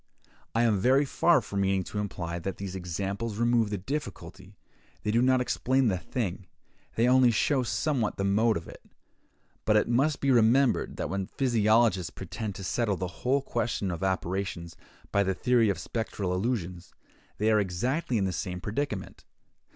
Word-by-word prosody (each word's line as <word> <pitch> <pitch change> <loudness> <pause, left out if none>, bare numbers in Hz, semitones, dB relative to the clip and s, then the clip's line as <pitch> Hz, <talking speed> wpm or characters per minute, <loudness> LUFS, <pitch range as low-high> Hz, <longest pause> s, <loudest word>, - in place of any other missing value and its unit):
I 115 - +3
am 110 -4 +2
very 130 +7 +4
far 170 +4 +3
from 100 -1 -3
meaning 95 -1 +1
to 105 - -5
imply 85 -4 -4
that 95 +2 -5
these 95 -1 -6
examples 100 +5 -4
remove 120 -2 +2
the 105 - -2
difficulty: 100 - -6 0.5
they 105 - 0
do 115 +2 +3
not 130 0 +3
explain 130 0 +1
the 95 - 0
thing; 95 -4 -4 0.5
they 115 +2 +3
only 130 0 +5
show 130 +4 +2
somewhat 115 +1 -1
the 100 - -1
mode 105 +3 +2
of 85 - -8
it. - - -12 0.8
But 105 - +2
it 105 - +3
must 135 +5 +1
be 140 - +2
remembered 120 +2 +3
that - - -3
when 95 -1 -2
physiologists 110 - +2
pretend 105 +5 -6
to 95 - -7
settle 100 +2 0
the 90 -1 -6
whole 135 +2 +1
question 105 -7 -2
of 85 - -5
apparitions 95 -3 -2 0.4
by 100 - +3
the 95 -1 0
theory 120 0 +3
of 100 - 0
spectral 95 -1 -3
illusions, 90 -4 -3 0.4
they 110 +2 +2
are 110 - +4
exactly 120 - -1
in 100 - +1
the 95 - -1
same 90 0 -4
predicament. 105 0 -4
105 Hz, 175 wpm, -28 LUFS, 95-120 Hz, 0.8 s, only